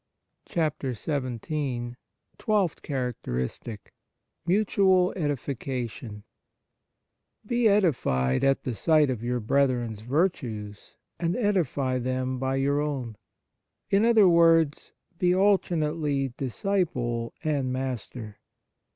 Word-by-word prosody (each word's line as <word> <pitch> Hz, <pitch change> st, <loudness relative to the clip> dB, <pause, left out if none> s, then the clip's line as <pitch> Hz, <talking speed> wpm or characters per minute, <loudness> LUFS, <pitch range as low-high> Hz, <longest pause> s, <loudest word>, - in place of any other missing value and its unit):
XVII 135 Hz, -3 st, -2 dB, 0.5 s
TWELFTH 205 Hz, -7 st, 0 dB
CHARACTERISTIC 115 Hz, -, -4 dB, 0.5 s
Mutual 190 Hz, -1 st, +3 dB
Edification 130 Hz, -, -4 dB, 1.2 s
BE 240 Hz, +1 st, +2 dB
edified 125 Hz, -, +2 dB
at 135 Hz, 0 st, +2 dB
the 125 Hz, -, -2 dB
sight 150 Hz, +3 st, +3 dB
of 120 Hz, -3 st, -4 dB
your 125 Hz, +1 st, -1 dB
brethren 125 Hz, 0 st, +1 dB
s 105 Hz, -, -11 dB
virtues, 115 Hz, -, -2 dB, 0.2 s
and 170 Hz, 0 st, 0 dB
edify 150 Hz, -, 0 dB
them 130 Hz, +1 st, -2 dB
by 130 Hz, 0 st, -1 dB
your 140 Hz, +2 st, +1 dB
own. 135 Hz, -7 st, -3 dB, 0.8 s
In 195 Hz, +2 st, +4 dB
other 225 Hz, -4 st, +6 dB
words, 165 Hz, -3 st, +4 dB, 0.3 s
be 180 Hz, 0 st, +3 dB
alternately 155 Hz, -8 st, +1 dB
disciple 125 Hz, -, -2 dB
and 140 Hz, -5 st, 0 dB
master. 125 Hz, -4 st, -5 dB
135 Hz, 90 wpm, -27 LUFS, 120-170 Hz, 1.2 s, other